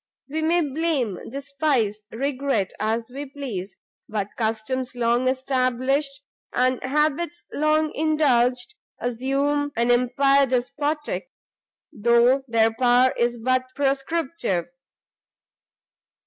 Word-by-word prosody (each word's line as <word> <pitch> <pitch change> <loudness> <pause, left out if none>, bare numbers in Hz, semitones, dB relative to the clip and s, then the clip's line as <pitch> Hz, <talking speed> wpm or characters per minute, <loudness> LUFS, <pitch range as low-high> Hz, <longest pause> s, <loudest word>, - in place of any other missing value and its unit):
We 315 +3 -2
may 335 +2 +2
blame, 285 - -1
despise, 275 -5 -1
regret 270 -5 -1
as 225 +2 -1
we 285 +2 -5
please, 240 -9 -6 0.3
but 210 -2 -2
customs 240 +3 -2
long 240 +1 +1
established, 265 +2 0 0.3
and 255 0 +1
habits 300 +5 0
long 305 +1 +1
indulged, 275 - +2 0.3
assume 275 +4 0
an 235 +1 +2
empire 275 +3 +3
despotic, 295 - -2 0.6
though 235 +3 +4
their 225 -1 +3
power 250 +2 +4
is 240 0 0
but 255 +2 +1
prescriptive. 270 - -1
260 Hz, 95 wpm, -24 LUFS, 240-285 Hz, 0.6 s, though